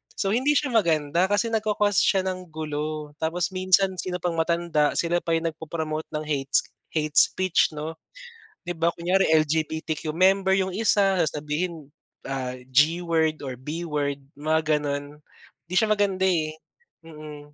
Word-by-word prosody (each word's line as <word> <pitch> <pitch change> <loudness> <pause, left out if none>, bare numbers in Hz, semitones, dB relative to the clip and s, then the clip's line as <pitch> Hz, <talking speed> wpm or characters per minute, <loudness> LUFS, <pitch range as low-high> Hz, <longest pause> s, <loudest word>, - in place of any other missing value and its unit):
So 195 - -1
hindi 265 +6 +2
siya 285 -2 +1
maganda, 170 -5 +2
kasi 205 +3 +1
nagko-cause 210 -3 +1
siya 190 -2 +3
ng 185 -1 -4
gulo, 155 -1 -4
tapos 170 +3 -1
minsan 185 0 +3
sino 180 0 -3
pang 175 -1 -2
matanda 170 -2 +1
sila 175 +1 +1
pa 165 -1 -1
yung 165 0 -1
nag 155 - -29
po-promote 160 -1 -4
ng 150 - -2
hates 140 -3 +1 0.3
hate 150 -1 -1
speech 185 -3 +3
'no? 160 +2 -6 0.6
Di 175 -2 -5
ba 170 +1 +1
kunyari 180 +3 +2 0.2
LGBTQ 155 0 -2
member 190 +2 +4
yung 190 -1 +1
isa, 200 -2 +3
sasabihin 150 +1 -4 0.4
ah, 130 -2 -3 0.2
G 155 +6 +4
word 160 -3 0
or 130 -3 -6
B 150 +6 -5
word 145 -4 -2 0.2
mga 155 0 +1
ganon, 145 0 -4 0.5
di 175 - -6
siya 215 +4 +3
maganda, 200 -3 +1
eh. 155 -3 0 0.5
Mm. 155 -2 -10
165 Hz, 155 wpm, -25 LUFS, 150-185 Hz, 0.6 s, member